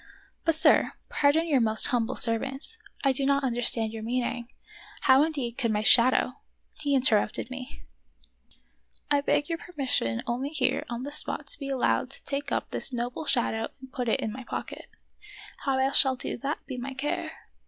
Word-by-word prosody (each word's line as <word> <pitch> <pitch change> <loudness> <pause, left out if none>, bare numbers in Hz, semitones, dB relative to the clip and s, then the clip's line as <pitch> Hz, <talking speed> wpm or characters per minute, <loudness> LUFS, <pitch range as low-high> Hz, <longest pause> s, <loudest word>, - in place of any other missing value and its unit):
" - - -36
But, 330 -1 +5
sir, 315 - +4 0.2
pardon 300 +3 +2
your 280 -6 +2
most 220 -1 +6
humble 245 -1 -1
servant; 265 +5 +3 0.4
I 275 - +3
do 265 +1 -2
not 280 +1 +1
understand 235 -3 -1
your 225 - -6
meaning. 240 +1 -3 0.5
How 265 0 +5
indeed 275 -6 -2
could 235 -4 0
my 210 0 -1
shadow 255 +2 +5 0.2
" - - -47
— - - -46
He 285 -2 +1
interrupted 240 -2 +1
me: 255 -1 -9 0.4
— - - -36
" - - -34
I 285 -1 +3
beg 290 +1 0
your 330 -1 -3
permission 260 - -2
only 245 +4 -3
here 310 - -1
on 240 +1 -5
the 285 - -6
spot 300 0 0
to - - -1
be 275 -2 -6
allowed 260 -1 0
to 275 - -5
take 280 0 -4
up - - -2
this - - +3
noble 245 +4 -4
shadow 225 -3 0
and 265 0 -14
put 250 -3 -2
it - - +1
in 215 - -3
my 260 +2 -8
pocket; - - -7 0.8
how 270 -1 +1
I 265 +1 +1
shall 265 -1 +3
do 260 - -5
that 275 +6 -5
be 260 -2 -7
my 265 +2 -6
care. 285 +3 -3
260 Hz, 195 wpm, -27 LUFS, 235-280 Hz, 0.8 s, most